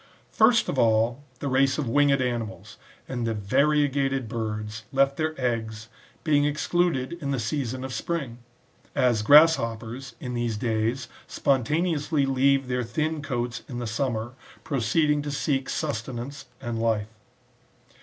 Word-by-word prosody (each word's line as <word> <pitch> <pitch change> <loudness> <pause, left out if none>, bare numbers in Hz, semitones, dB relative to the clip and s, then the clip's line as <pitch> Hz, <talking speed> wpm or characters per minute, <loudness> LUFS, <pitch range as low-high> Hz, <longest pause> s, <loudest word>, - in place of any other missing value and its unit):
First 230 +1 +4
of 135 - -1
all, 115 +3 +2 0.2
the 145 - -2
race 135 0 +2
of 150 -5 -2
winged 140 +1 +3
animals, 115 -5 -4 0.3
and 125 -2 -3
variegated 135 +4 +1
birds, 110 -1 -4
left 135 0 +3
their 155 0 -2
eggs, 110 -3 -2 0.3
being 145 -3 +3
excluded 150 -1 0
in 140 - -3
the 135 -2 0
season 130 +2 -2
of 130 -1 -5
spring; 130 -1 -3 0.6
as 120 -4 +3
grasshoppers, 120 -3 +4
in 125 -1 -5
these 120 -2 -1
days, 115 +3 -1 0.2
spontaneously 150 +2 +1
leave 135 0 +2
their 125 0 -1
thin 155 +6 -2
coats 120 -4 -3
^ - - -24
in 125 - -5
the 120 - -3
summer, 115 0 -2 0.3
proceeding 145 +3 +1
to 145 - -5
seek 135 -1 -1
sustenance 130 -1 -4
and 120 -3 -4
life. 110 -1 0
130 Hz, 135 wpm, -26 LUFS, 115-145 Hz, 0.6 s, First